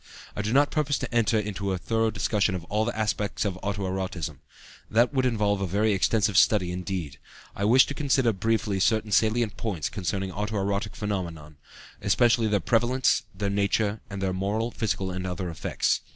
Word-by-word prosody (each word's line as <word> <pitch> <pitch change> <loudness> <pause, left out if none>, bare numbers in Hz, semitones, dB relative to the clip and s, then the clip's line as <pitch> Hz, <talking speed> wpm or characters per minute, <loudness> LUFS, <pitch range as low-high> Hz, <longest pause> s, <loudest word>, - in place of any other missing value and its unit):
I - - -2
do 105 +1 -2
not 140 +3 +4
purpose 145 -3 +1
to - - -5
enter 115 -1 +3
into 100 -2 -2
a - - -1
thorough 115 +4 0
discussion 100 -1 0
of 90 - -5
all 105 +5 -1
the 120 - -3
aspects 105 -1 -1
of 95 -2 -2
auto 100 0 -2
erotism. 95 -6 -3 0.5
That 120 +5 +3
would 130 -2 +2
involve 105 -4 0
a 95 - 0
very 105 +4 +2
extensive 100 +1 +2
study 90 -5 +3
indeed. 90 -6 -4 0.4
I 100 - -1
wish 125 +5 +6
to - - -5
consider 135 -5 +2
briefly 105 0 0
certain 110 +2 +1
salient 110 +1 +2
points 85 -11 -2
concerning 95 +1 -3
auto 105 +3 -3
erotic 100 +2 -2
phenomena, 85 -7 -4 0.5
especially 115 +3 +3
their 105 -1 +2
prevalence, 120 +6 +2
their 100 -1 -2
nature, 100 +1 0
and 100 -1 -5
their 95 -1 0
moral, 105 +5 -1
physical, 95 -4 -2
and 95 0 -4
other 90 -1 -4
effects. 80 - -1
105 Hz, 180 wpm, -26 LUFS, 95-110 Hz, 0.5 s, wish